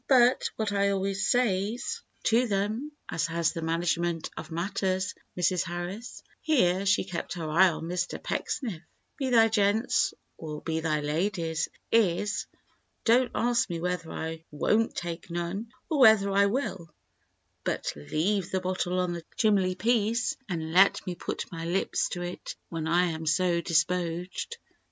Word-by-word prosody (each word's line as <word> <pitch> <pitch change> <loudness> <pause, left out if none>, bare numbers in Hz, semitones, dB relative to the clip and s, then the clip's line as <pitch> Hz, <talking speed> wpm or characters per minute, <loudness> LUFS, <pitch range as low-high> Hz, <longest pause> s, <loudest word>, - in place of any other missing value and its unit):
But 250 -1 +5
what 215 -2 -1
I 200 0 +2
always 195 0 0
says 240 - 0 0.2
to 235 +2 +3
them 215 +8 -1 0.2
as 165 - -1
has 170 0 0
the 165 - -4
management 165 0 0
of - - -7
matters, 185 +2 -1 0.2
Mrs. 180 0 +2
Harris,'"—here 190 - -1
she 205 - +4
kept 180 -3 -4
her 165 -3 -4
eye 180 +5 +5
on 160 - -5
Mr. 175 +1 -2
Pecksniff—"'be 230 - -4
they 225 -2 +6
gents 215 +2 +2 0.2
or 155 -2 -7
be 160 -1 -1
they 155 -2 0
ladies—is, 175 +4 0 0.6
Dont 240 +2 +4
ask 235 -1 +2
me 170 -1 -3
whether 180 -1 -2
I 160 0 -5
wont 215 +9 +1
take 170 0 -5
none, 175 +6 -3 0.2
or 310 -4 0
whether 220 -5 +7
I 200 +1 +4
will, 200 - -2 0.7
but - - -2
leave 170 - -1
the 190 - 0
bottle 185 0 -1
on 180 -1 0
the 170 -1 -6
chimley 195 -4 +3
piece, 230 +2 +1
and 160 -3 -3
let 195 +2 +5
me 180 - -2
put - - -4
my 165 -1 -5
lips 180 +3 0
to 175 -1 -3
it 175 0 -6
when 165 -1 -3
I 175 +2 +4
am 160 0 -5
so 170 +1 +2
dispoged. 175 - -1
185 Hz, 145 wpm, -28 LUFS, 170-210 Hz, 0.7 s, whether